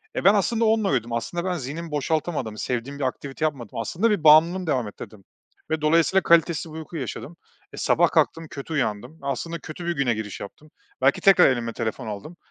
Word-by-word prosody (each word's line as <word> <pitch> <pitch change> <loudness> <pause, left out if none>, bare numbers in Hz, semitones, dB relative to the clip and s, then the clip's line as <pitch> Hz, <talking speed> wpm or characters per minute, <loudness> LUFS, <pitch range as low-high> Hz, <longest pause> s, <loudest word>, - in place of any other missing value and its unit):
Eee, - - -2
ben 195 - +7
aslında 225 +3 +1
onunla 220 -2 +2
uyudum, 120 -3 -1
aslında 170 +10 -3
ben 185 - 0
zihnimi 155 +5 -6
boşaltamadım, 150 -6 -2
sevdiğim 125 +5 -3
bir 140 - -2
aktivite 135 +4 -3
yapmadım, 130 -8 -4
aslında 200 - 0
bir 200 -7 0
bağımlılığımı 165 +4 +6
devam 125 -7 0
ettirdim 105 0 -11 0.5
ve 160 -1 -1
dolayısıyla 165 +5 +3
kalitesiz 165 -1 +2
bir - - -7
uyku 160 +1 -7
yaşadım. 150 +4 -6 0.4
E, - - -9
sabah - - +3
kalktım, 165 0 +1
kötü 140 +3 -7
uyandım, 125 +3 -2
aslında 165 +4 -3
kötü 155 +4 -8
bir - - +1
güne 135 -4 +1
giriş 105 -2 -6
yaptım, 150 +9 -11 0.3
belki 135 +2 +3
tekrar 195 -2 +7
elime 120 -3 -2
telefon 115 +1 -4
aldım. 110 - -7
150 Hz, 190 wpm, -24 LUFS, 125-170 Hz, 0.5 s, ben